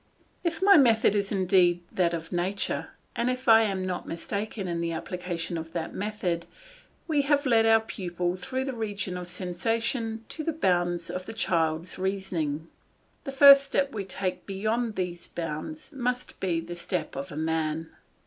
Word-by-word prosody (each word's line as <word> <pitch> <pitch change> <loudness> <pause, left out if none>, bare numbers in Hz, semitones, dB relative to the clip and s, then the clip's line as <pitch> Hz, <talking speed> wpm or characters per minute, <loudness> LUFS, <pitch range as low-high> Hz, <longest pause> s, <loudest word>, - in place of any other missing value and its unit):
If 340 +1 -1
my 400 -1 +8
method 230 -7 +5
is 200 -1 0
indeed 185 -3 +3
that 170 -2 +1
of 165 0 -7
nature, 185 +3 -1 0.3
and 235 +1 +1
if 255 0 -3
I 225 -1 +8
am 195 -3 -1
not 185 -1 -3
mistaken 200 +3 -4
in 170 -1 -2
the 170 0 -1
application 175 0 -4
of 160 0 -8
that 165 -1 -3
method, 190 -5 -2 0.6
we 305 -3 +3
have 285 +1 +2
led 225 -3 +4
our 225 0 +6
pupil 180 -4 -3
through 260 +7 -3
the 270 - -3
region 205 -5 -3
of 180 -1 -5
sensation 225 +6 -2
to 315 - -5
the 325 - -1
bounds 175 - 0
of 185 0 -5
the 225 - -6
child's 165 -5 0
reasoning; 175 -5 -2 0.6
the 275 - -3
first 275 0 +9
step 275 0 0
we 205 -3 -3
take 185 -1 -4
beyond 215 +3 -1
these 175 -2 -4
bounds 170 - -5
must 250 -2 -3
be 175 -3 0
the 175 +1 -7
step 170 - -3
of 135 +1 -5
a 145 - -7
man. 160 0 -1
190 Hz, 170 wpm, -27 LUFS, 175-230 Hz, 0.6 s, first